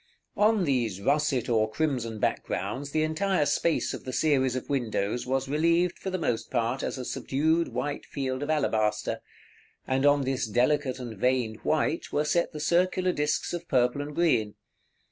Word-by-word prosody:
§ - - -37
XXXIV. - - -6
On 220 -3 +2
these 120 - 0
russet 140 +2 +1
or 110 -2 +2
crimson 120 -4 -1
backgrounds 140 +5 -2
the 155 +2 +1
entire 170 +2 +1
space 165 +2 +1
of - - -7
the 130 - -5
series 130 -3 +2
of 130 - -4
windows 120 -4 -1
was 135 +1 0
relieved, 170 +4 +2
for 190 - -4
the 185 - -2
most 120 -9 -2
part, 120 +1 0
as - - -3
a 130 - -5
subdued 160 +7 0
white 145 -1 -4
field 130 -2 -3
of 145 - -3
alabaster; 110 -9 0 0.7
and 130 +1 0
on 145 -1 +4
this 130 -2 -1
delicate 130 +4 +1
and 120 -5 -7
veined 125 -3 +1
white 155 +4 -1
were 150 - +1
set 170 +3 +1
the 150 - -7
circular 180 +3 +2
disks 150 0 -1
of 175 -1 -5
purple 125 +1 +2
and 145 0 -6
green. 120 -12 +2
140 Hz, 180 wpm, -27 LUFS, 125-155 Hz, 0.7 s, on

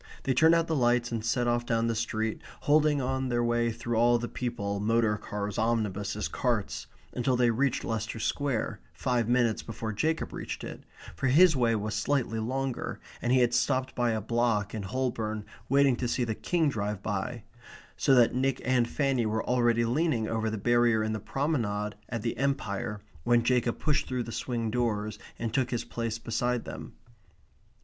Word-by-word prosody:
They 135 - +1
turned 160 +6 +5
out 165 -1 +2
the 160 - -1
lights 120 -2 +2
and 115 -2 -2
set 120 +2 +1
off 120 0 +1
down 115 -1 0
the 115 - +1
street, 110 -1 -2 0.2
holding 150 0 +3
on 130 0 -1
their 120 -1 +1
way 120 0 +1
through 120 0 -3
all 120 +1 +5
the 120 +1 -3
people, 100 -6 -3
motor 110 0 +2
cars, 105 -1 -4
omnibuses, 105 -2 0
carts, 115 -6 -1 0.3
until 125 +1 +1
they 120 -1 +3
reached 130 +3 0
Leicester 110 0 -3
Square, 135 0 -1
five 120 -3 0
minutes 120 -3 +2
before 110 -1 -5
Jacob 160 +9 -1
reached - - -5
it, - - -8 0.3
for 135 - -1
his 160 +5 +6
way 120 -3 +2
was 105 0 -2
slightly 115 0 0
longer, 130 +3 -3 0.2
and 120 - 0
he 130 0 +5
had 120 - +4
been 120 - +3
stopped 130 +2 0
by 120 -1 +1
a 110 -1 0
block 115 -2 0
in 110 - -3
Holborn 110 -1 -2 0.2
waiting 140 -1 +4
to 125 - -1
see 125 +1 0
the 115 -2 -1
King 165 +7 0
drive 105 -6 -2
by, 105 +3 -3 0.5
so 135 - +3
that 120 -2 +5
Nick 130 +1 0
and 125 -2 +2
Fanny 135 -5 +1
were 110 +1 -1
already 120 -2 +2
leaning 125 -2 +1
over 110 0 -1
the 110 - -3
barrier 120 0 +3
in 110 0 -1
the 110 - -2
promenade 110 -4 -1 0.2
at 120 -3 -3
the 115 - -1
Empire 105 -7 -2 0.2
when 120 -1 +3
Jacob 120 -1 +1
pushed 150 -2 0
through 125 -1 -1
the 115 - -7
swing 115 -1 -2
doors 110 -3 -1 0.2
and 115 -1 -3
took 130 -2 +1
his 120 - -2
place 115 -1 -3
beside 120 +1 -1
them. - - -8
120 Hz, 190 wpm, -29 LUFS, 110-125 Hz, 0.5 s, his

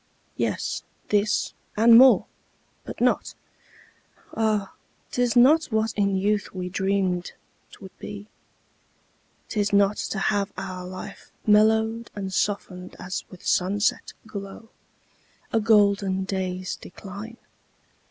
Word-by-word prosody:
Yes, - - -2 0.3
this, 210 0 +1 0.2
and 230 +2 +7
more; 260 +2 +7 0.6
but - - -8
not - - +1 1.0
Ah, 215 -3 0 0.4
'tis 245 -1 0
not 290 +7 +6
what 220 -1 -1
in 200 -1 +1
youth 205 +1 0
we 180 -1 -4
dream'd 190 -2 -1 0.4
'twould 190 -1 -13
be! 205 0 -8 1.2
'Tis 210 -2 -1
not 200 0 +3
to - - -3
have 200 +1 0
our 185 -1 -6
life 185 +2 -9
Mellow'd 220 +2 +3
and 195 -2 -5
soften'd 185 -3 -2
as 185 +1 -5
with 180 - -14
sunset 200 +3 +1
glow, 200 +1 -8 0.8
A 225 - +4
golden 200 -3 +3
day's 185 -1 -3
decline. 200 +5 -10
200 Hz, 110 wpm, -25 LUFS, 190-220 Hz, 1.2 s, and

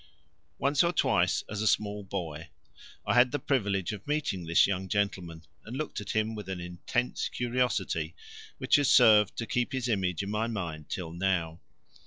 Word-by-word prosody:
Once 140 +3 +2
or 170 - +2
twice 175 - +2
as 105 0 -4
a 110 - +1
small 105 0 +1
boy 85 -5 -6 0.6
I 100 - +1
had 125 +1 +5
the 145 - 0
privilege 100 -11 0
of 105 +2 -8
meeting 140 - -1
this 85 - +5
young 95 -1 -2
gentleman 90 -5 -2 0.2
and 120 +4 -7
looked 155 -7 -4
at 105 - -5
him 110 +1 +1
with 105 -3 -7
an 95 -2 -4
intense 90 +8 -2
curiosity 120 -10 -1 0.4
which - - +3
has 145 -2 +2
served 105 -5 +6
to 115 - -2
keep 120 +3 -1
his 130 -2 -1
image 95 -5 0
in 100 - -4
my 110 +2 0
mind 85 -9 -5
till 85 -3 -4
now. 85 -3 -1
100 Hz, 180 wpm, -29 LUFS, 90-120 Hz, 0.6 s, served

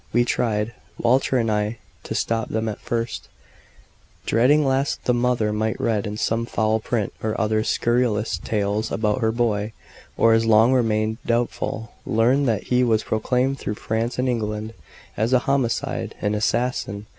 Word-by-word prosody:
We 120 +1 +4
tried, 110 -2 0 0.2
Walter 130 +2 +2
and 115 -2 +1
I, 105 +2 -1 0.3
to - - -4
stop 115 -1 -1
them 110 0 -1
at 105 - -4
first, 115 -1 -3 1.0
dreading 140 +6 +4
lest 135 +1 0
the 125 - +3
mother 120 -3 +1
might 110 +1 -1
read 105 -3 0
in 105 0 -5
some 115 +2 0
foul 110 -1 +1
print 110 -2 -2
or 110 -1 -2
other 110 0 +1
scurrilous 120 -2 +1
tales 105 0 -1
about 110 +3 0
her 110 -1 +2
boy; 110 -2 0 0.4
or, 115 0 +5
as 115 0 +2
long 115 +3 +5
remained 110 -2 +1
doubtful, 115 -1 -2
learn 125 +6 +2
that 110 -4 0
he 125 0 +2
was 110 -3 +2
proclaimed 125 +5 0
through 105 - -3
France 115 +3 -2
and 125 +1 0
England 110 -2 -2 0.4
as 110 +5 +1
a 125 - +6
homicide 135 -4 -1
an 105 - 0
assassin. 105 -1 -1
115 Hz, 160 wpm, -23 LUFS, 110-120 Hz, 1.0 s, a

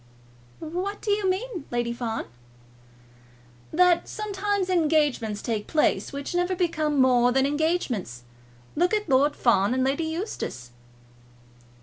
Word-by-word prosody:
"What 360 +6 -4
do 420 - -2
you 405 -2 +1
mean, 375 - -3
Lady 240 -1 -1
Fawn?" 235 -2 -3 1.5
"That 355 +1 +3
sometimes 410 -2 -2
engagements 300 - +1
take 220 -3 -2
place 310 - +1
which 280 +2 -5
never 355 +1 0
become 315 -5 0
more 250 -1 +4
than 265 +1 +2
engagements. 280 - -1 0.5
Look 355 +6 +2
at 420 -2 -2
Lord 285 +1 +3
Fawn 215 -1 +2
and 260 - +1
Lady 275 +5 0
Eustace." 320 - -5
310 Hz, 120 wpm, -25 LUFS, 250-360 Hz, 1.5 s, more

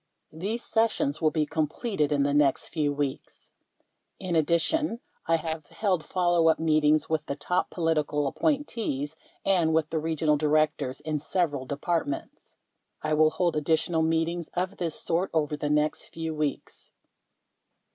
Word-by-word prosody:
These 205 +9 -3
sessions 220 -10 0
will 155 - +4
be 155 -1 0
completed 155 - -1
in 145 -1 +2
the 140 0 +1
next 145 -2 +2
few 150 -3 0
weeks. 140 -2 -4 0.7
In 180 -3 -2
addition, 170 - +1 0.3
I 165 - +4
have 160 -1 -3
held 185 -6 0
follow 175 -2 +2
up 160 - +3
meetings 155 -1 +3
with 160 -1 0
the 140 - -2
top 180 +5 -1
political 155 -3 0
appointees 185 - -1 0.3
and 170 -5 +3
with 160 -1 +1
the 160 - 0
Regional 155 -1 +1
Directors 150 -3 +1
in 155 -1 -2
several 145 -4 -1
Departments. 145 0 -3 0.5
I 155 0 0
will 155 0 +5
hold 170 +2 0
additional 160 +2 +1
meetings 165 +1 0
of 185 +3 -2
this 165 -3 -2
sort 175 +3 0
over 150 -1 +1
the 145 0 -3
next 150 +1 +1
few 160 -1 -4
weeks. 150 -2 -4
160 Hz, 145 wpm, -27 LUFS, 150-170 Hz, 0.7 s, will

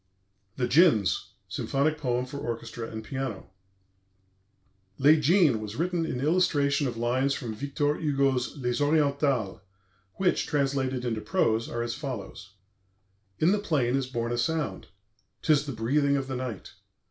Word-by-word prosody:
"THE 125 - 0
DJINNS," 125 - +4 0.2
SYMPHONIC 150 +3 -1
POEM 125 -3 0
FOR 140 +2 -7
ORCHESTRA 115 -1 -5
AND 110 0 -6
PIANO 130 -5 -5 1.5
Les 150 +4 +6
Djinns 155 - +4
was 110 0 -6
written 170 +1 -1
in 125 - -3
illustration 145 -2 +2
of 120 -2 -4
lines 130 +4 +1
from 120 -5 -5
Victor 140 +4 -1
Hugo's 140 -3 0
Les 125 0 -1
Orientales, 140 -8 +1 0.5
which, 190 -2 +1
translated 135 -3 0
into 115 -3 -2
prose, 115 - +1
are 120 0 -2
as 120 0 -3
follows: 110 -7 -7 0.8
"In 160 - +3
the 210 - +2
plain 140 -11 +1
is 135 -2 -1
born 120 -2 -3
a 120 - -1
sound; 160 +3 -2 0.6
'tis 150 -2 +3
the - - -2
breathing 140 +5 +1
of 135 - -2
the 130 - -3
night. 125 -6 -6
135 Hz, 145 wpm, -27 LUFS, 120-150 Hz, 1.5 s, Les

